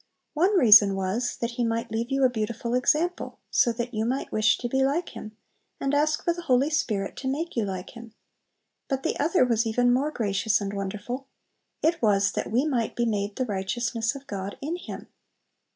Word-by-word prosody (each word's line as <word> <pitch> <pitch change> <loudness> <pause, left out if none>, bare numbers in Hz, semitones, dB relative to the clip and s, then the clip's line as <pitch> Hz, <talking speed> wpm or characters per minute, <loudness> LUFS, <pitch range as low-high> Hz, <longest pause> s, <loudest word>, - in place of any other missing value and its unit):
One 370 +6 +3
reason 210 - +7
was, 195 +6 -2
that 235 0 -1
He 240 +1 -2
might 230 0 -2
leave 230 +2 -2
you 270 0 +1
a - - +7
beautiful 235 +1 -3
example, 310 +8 0
so 240 - +3
that 240 +2 -4
you 215 0 -1
might 255 +4 -2
wish 215 0 +3
to 245 - -3
be 265 +2 0
like 295 +6 0
Him, 215 0 -10 0.4
and 275 +1 -1
ask 300 +1 +1
for 340 - +1
the 345 - -7
Holy 270 -1 +2
Spirit 205 -9 -1
to 265 - -5
make 310 +6 -3
you 230 -3 0
like 185 -2 -5
Him. 235 -3 -12 0.7
But 270 -1 -2
the - - 0
other 315 -1 +3
was 230 -2 +1
even 245 +2 +2
more 275 +4 +1
gracious 215 -4 0
and 200 -1 -4
wonderful, 210 +7 -5 0.6
it 330 +1 +2
was 200 -2 +3
"that - - -3
we 250 +6 +2
might 245 -7 -1
be 240 - 0
made 205 -2 -2
the 255 - -1
righteousness 230 +4 -2
of 275 0 -9
God 200 -3 -5
in 305 +5 -3
Him." 355 - -8
240 Hz, 200 wpm, -26 LUFS, 215-275 Hz, 0.7 s, reason